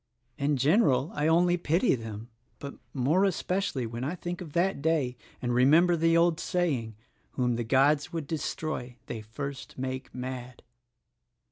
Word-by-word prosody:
In 145 0 +1
general 145 - +3
I 150 +1 0
only 175 +2 +4
pity 170 - +2
them, 115 -2 -6 0.3
but 140 0 -7 0.2
more 145 +8 +2
especially 185 -7 0
when 115 +2 -5
I 150 +7 -2
think 175 0 -5
of 160 -5 -8
that 180 -2 +1
day 145 -5 +1 0.3
and 120 0 0
remember 155 +8 +5
the 165 0 +3
old 170 -1 +3
saying, 140 - -1 0.4
'Whom 125 -2 0
the 120 - -2
Gods 140 +6 +3
would 165 -4 -3
destroy 150 -4 -4
they 115 - -5
first 140 +6 -7
make 130 0 -4
mad.' 125 -1 -7
145 Hz, 150 wpm, -28 LUFS, 125-170 Hz, 0.4 s, remember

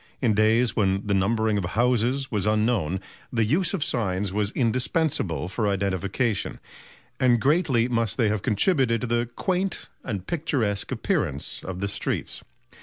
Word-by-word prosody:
In 120 -5 +2
days 110 +2 +3
when 95 -1 +1
the 105 - 0
numbering 110 +2 +2
of - - -3
houses 125 +6 +1
was 105 -3 0
unknown, 105 -5 +1 0.3
the 115 -3 +2
use 175 - +1
of 165 - -1
signs 95 -4 -1
was 105 0 +1
indispensable 120 - 0
for 105 +3 -1
identification; 100 +3 -1 0.6
and 120 -2 +4
greatly 135 -3 +2
must 115 -4 -1
they 115 -4 +3
have 105 -2 -1
contributed 120 - +2
to - - -1
the 120 0 0
quaint 190 0 -1
and 100 -7 -4
picturesque 130 -11 -1
appearance 70 +1 -2
of 95 0 -6
the 100 - 0
streets. 100 - -3
110 Hz, 150 wpm, -25 LUFS, 100-125 Hz, 0.6 s, and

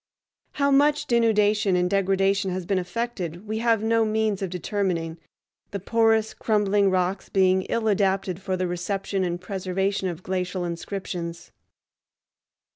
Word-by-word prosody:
How 280 -1 +1
much 295 +1 +3
denudation 215 -5 +3
and 180 0 +2
degradation 195 0 +1
has 185 -1 -3
been 195 0 +1
effected 180 -2 -4
we 220 +1 -2
have 225 -2 +2
no 225 0 +3
means 215 -2 0
of 190 - -2
determining, 175 -3 -2 0.5
the 200 - -4
porous, 225 +2 +2
crumbling 205 -2 +2
rocks 185 +1 -1
being 190 -1 +3
ill 230 -1 0
adapted 195 -2 +1
for 190 -1 -2
the 185 - -1
reception 190 +2 -2
and 175 -1 -2
preservation 190 +1 -2
of 175 0 -5
glacial 185 -1 -2
inscriptions. 170 -1 -5
195 Hz, 135 wpm, -25 LUFS, 180-215 Hz, 0.5 s, much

